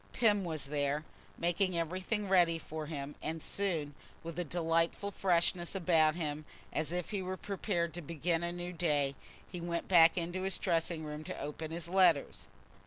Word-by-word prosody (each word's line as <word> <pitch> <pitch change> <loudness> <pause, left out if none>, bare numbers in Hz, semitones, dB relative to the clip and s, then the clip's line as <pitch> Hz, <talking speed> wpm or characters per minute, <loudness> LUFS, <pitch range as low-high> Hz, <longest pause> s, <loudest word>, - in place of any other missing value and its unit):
Pym 210 -4 +3
was 160 -5 -2
there, 145 +1 -1 0.3
making 175 +1 +1
everything 185 +5 -1
ready 175 -3 +4
for 155 -1 -6
him, 145 -2 -5
and 160 +1 -3
soon, 160 -5 -2 0.3
with 165 +1 -5
a - - +1
delightful 165 +4 0
freshness 175 -1 +1
about 165 -4 +4
him, 155 -3 -3 0.3
as 155 0 0
if 180 +2 -2
he 200 -2 -1
were 185 0 -4
prepared 185 -5 -2
to 175 - -5
begin 165 +1 -1
a 170 0 -1
new 175 +1 -5
day, 150 -5 +1 0.3
he 180 -1 -7
went 170 0 -2
back 170 -1 +7
into 175 +2 -2
his 190 0 -1
dressing 165 -2 0
room 150 0 -6
to - - -5
open 150 +2 -5
his 165 0 -2
letters. 185 +1 +3
170 Hz, 175 wpm, -33 LUFS, 155-180 Hz, 0.3 s, back